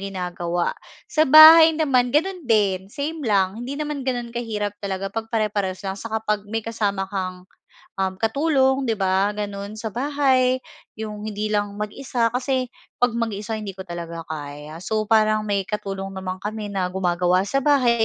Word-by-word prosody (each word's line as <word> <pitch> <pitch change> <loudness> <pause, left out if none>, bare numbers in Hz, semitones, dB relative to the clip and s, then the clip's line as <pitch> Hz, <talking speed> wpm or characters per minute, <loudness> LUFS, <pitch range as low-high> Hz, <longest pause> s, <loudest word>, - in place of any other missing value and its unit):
ginagawa. 180 -3 -2 0.4
Sa 310 0 +3
bahay 315 +2 +10
naman 260 -6 +2
gano'n 360 +4 +1
din, 200 -5 +2
same 300 +7 -4
lang 195 -1 +2
hindi 260 +3 -5
naman 295 -2 -3
gano'n 245 -2 -2
kahirap 210 -4 -3
talaga 195 0 -3
pag-pare-parehas 210 -4 -2
lang 190 - -2
saka 220 +1 -3
'pag 210 -1 0
may 225 +1 -2
kasama 205 -4 -1
kang, 185 -2 -4 0.5
um, 190 -1 0
katulong 265 +2 +2
'di 235 - +1
ba 190 +1 +2
gano'n 205 -1 -5
sa 225 - -3
bahay 260 +1 +1 0.4
yung 210 -1 -6
hindi 215 0 -3
lang 205 -1 0
mag-isa. 230 +2 -1
Kasi 255 +1 -1 0.3
'pag 245 -1 +3
mag-isa, 220 -1 -2
hindi 210 -2 -5
ko 190 0 -10
talaga 170 -1 -6
kaya. 150 0 -7
So 215 -1 -1
parang 215 -1 +3
may 200 -1 0
katulong 195 -1 -4
naman 185 -1 -5
kami 210 0 -4
na 190 -3 -1
gumagawa 180 -1 +1
sa 275 +5 0
bahay 245 -6 +4
210 Hz, 160 wpm, -23 LUFS, 195-245 Hz, 0.5 s, bahay